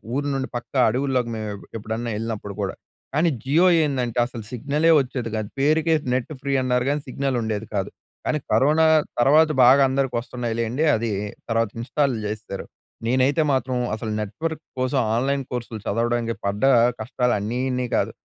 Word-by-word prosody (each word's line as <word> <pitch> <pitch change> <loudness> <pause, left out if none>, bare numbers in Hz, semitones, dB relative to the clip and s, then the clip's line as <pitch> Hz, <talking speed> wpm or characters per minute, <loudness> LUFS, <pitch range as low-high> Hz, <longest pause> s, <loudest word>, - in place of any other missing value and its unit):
ఊరు 145 +1 -1
నుండి 135 -1 -2
పక్క 120 - -10 0.2
అడవుల్లోకి 130 0 0
మేము 110 -1 -4 0.3
ఎప్పుడన్నా 110 +2 -4
వెళ్ళినప్పుడు 110 -2 -4
కూడా. 95 - -2 0.4
కానీ 160 +4 +3
జియో 150 +7 +3 0.2
ఏందంటే, 125 -5 -2
అసలు 120 -2 -8
సిగ్నల్ 145 +6 0
వచ్చేది 125 -3 -3
కాదు. 110 -2 -3
పేరుకే 155 +3 +3 0.2
నెట్ 130 +3 -1
ఫ్రీ 140 0 -1
అన్నారు 125 -1 +1
కానీ 145 +1 0
సిగ్నల్ 135 0 -1
ఉండేది 110 -1 -2
కాదు. 100 -2 -1 0.4
కానీ, 150 - 0
కరోనా 155 +4 +4 0.4
తర్వాత 155 +5 +5
బాగా 130 +3 +7
అందరికి 135 -1 0
వస్తున్నాయి 120 -1 -4
లెండి. 120 +7 0
అది 115 0 -1 0.4
తర్వాత 115 -1 +1
ఇన్స్టాల్ 140 +1 0
జేసేరు. 105 -2 -5 0.4
నేనైతే 130 +6 +3
మాత్రం 130 -1 0 0.2
అసలు 110 0 -5
నెట్ 105 -2 -5
వర్క్ 160 -1 -2 0.2
కోసం, 130 +1 +1 0.2
ఆన్‍లైన్ 135 +2 0
కోర్సులు 120 -3 -4
చదవడానికి 115 +1 0
పడ్డ 100 +3 -2 0.4
కష్టాలు 125 +2 0
అన్నీ 110 +5 -3
ఇన్ని 125 0 -1
కాదు. - - +1
125 Hz, 160 wpm, -23 LUFS, 115-140 Hz, 0.4 s, బాగా